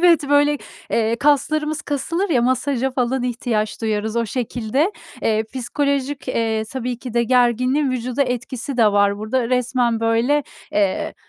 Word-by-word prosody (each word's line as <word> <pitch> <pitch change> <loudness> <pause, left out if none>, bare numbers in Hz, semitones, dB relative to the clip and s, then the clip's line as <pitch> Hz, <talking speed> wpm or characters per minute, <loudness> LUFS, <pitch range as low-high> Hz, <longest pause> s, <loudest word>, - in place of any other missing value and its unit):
Evet, 335 -5 +4
böyle, 290 0 +4 0.3
eee, 225 0 +1
kaslarımız 300 +3 +1
kasılır 335 +7 -2
ya, 245 -5 +3
masaja 260 +1 +1
falan 255 0 0
ihtiyaç 235 -3 -2
duyarız 220 0 -1
o 235 -1 +1
şekilde. 250 - -1 0.3
Eee, 220 0 +1
psikolojik, 275 +2 -1
eee, 225 -3 0
tabii 250 -2 -3
ki 245 -2 -8
de 235 - +3
gerginliğin 255 +3 +2
vücuda 255 +2 -1
etkisi 255 +1 -4
de 220 -4 +4
var 200 0 +3
burada. 230 +3 -1
Resmen 250 -2 +1
böyle, 230 +6 +2 0.3
eee, 200 -2 0
250 Hz, 145 wpm, -21 LUFS, 230-280 Hz, 0.3 s, Evet